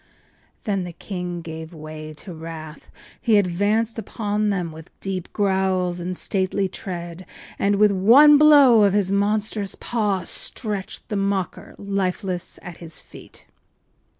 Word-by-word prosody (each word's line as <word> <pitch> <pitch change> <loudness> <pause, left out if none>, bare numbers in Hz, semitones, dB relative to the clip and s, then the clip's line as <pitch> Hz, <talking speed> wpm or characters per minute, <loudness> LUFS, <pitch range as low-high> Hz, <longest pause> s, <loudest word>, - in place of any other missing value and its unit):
” - - -38
Then 195 -3 -1
the 175 -1 -7
king 180 -2 -5
gave 160 +1 -8
way 155 0 -8
to 180 +4 -10
wrath. 160 -1 -9 0.3
He 225 -3 +4
advanced 205 +5 +1
upon 210 0 -2
them 180 -5 -1
with 160 +1 -12
deep 190 -2 -4
growls 190 -3 0
and 180 +1 -4
stately 190 0 0
tread 175 -2 -7 0.4
and 200 +1 +2
with 210 0 +5
one 260 +10 +7
blow 285 -7 +7
of 200 -2 +4
his 200 -2 +1
monstrous 205 0 0
paw 210 -5 -1
stretched 205 -5 -4
the 210 - -1
mocker 195 -2 -2
lifeless 190 -2 -3
at 175 -2 -9
his 165 -2 -9
feet. - - -14
190 Hz, 140 wpm, -22 LUFS, 175-210 Hz, 0.4 s, one